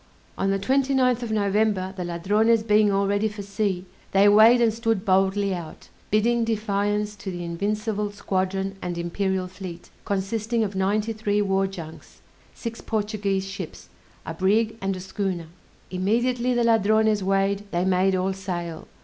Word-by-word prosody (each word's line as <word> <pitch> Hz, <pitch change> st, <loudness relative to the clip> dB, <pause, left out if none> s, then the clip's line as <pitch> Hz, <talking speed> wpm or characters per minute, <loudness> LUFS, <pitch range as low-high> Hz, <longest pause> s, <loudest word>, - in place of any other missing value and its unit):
On 195 Hz, -, 0 dB
the 195 Hz, -, +2 dB
29th 260 Hz, +2 st, +2 dB
of 235 Hz, -2 st, -4 dB
November, 205 Hz, -2 st, +1 dB
the 185 Hz, -, -4 dB
Ladrones 210 Hz, +6 st, +2 dB
being 210 Hz, -1 st, +4 dB
all 200 Hz, 0 st, +2 dB
ready 205 Hz, +2 st, +1 dB
for 210 Hz, -1 st, -6 dB
sea, 200 Hz, -2 st, -2 dB, 0.3 s
they 195 Hz, +1 st, +6 dB
weighed 220 Hz, +4 st, +7 dB
and 230 Hz, -2 st, +3 dB
stood 225 Hz, -3 st, -1 dB
boldly 195 Hz, +1 st, +2 dB
out, 170 Hz, -3 st, -8 dB, 0.2 s
bidding 230 Hz, +3 st, +2 dB
defiance 210 Hz, -1 st, -1 dB
to 200 Hz, -, -6 dB
the 175 Hz, -1 st, -5 dB
invincible 210 Hz, +4 st, -2 dB
squadron 195 Hz, -1 st, -2 dB
and 175 Hz, -1 st, -4 dB
imperial 185 Hz, +2 st, -1 dB
fleet, 180 Hz, -2 st, -9 dB
consisting 220 Hz, +4 st, -1 dB
of 205 Hz, -1 st, -3 dB
ninety 205 Hz, +4 st, 0 dB
three 210 Hz, -1 st, 0 dB
war 195 Hz, -1 st, +1 dB
junks, 170 Hz, -5 st, -10 dB, 0.3 s
six 230 Hz, -1 st, -6 dB
Portuguese 205 Hz, -3 st, -1 dB
ships, 195 Hz, -3 st, -8 dB, 0.4 s
a 160 Hz, -, -4 dB
brig, 210 Hz, +6 st, +1 dB
and 195 Hz, 0 st, -1 dB
a -, -, -6 dB
schooner. 190 Hz, -2 st, -3 dB, 0.5 s
Immediately 240 Hz, +6 st, +1 dB
the 240 Hz, -, +2 dB
Ladrones 220 Hz, -1 st, +3 dB
weighed, 195 Hz, +1 st, +1 dB
they 175 Hz, -1 st, 0 dB
made 190 Hz, +1 st, +2 dB
all 185 Hz, +1 st, 0 dB
sail. 175 Hz, -4 st, -5 dB
200 Hz, 155 wpm, -24 LUFS, 190-220 Hz, 0.5 s, weighed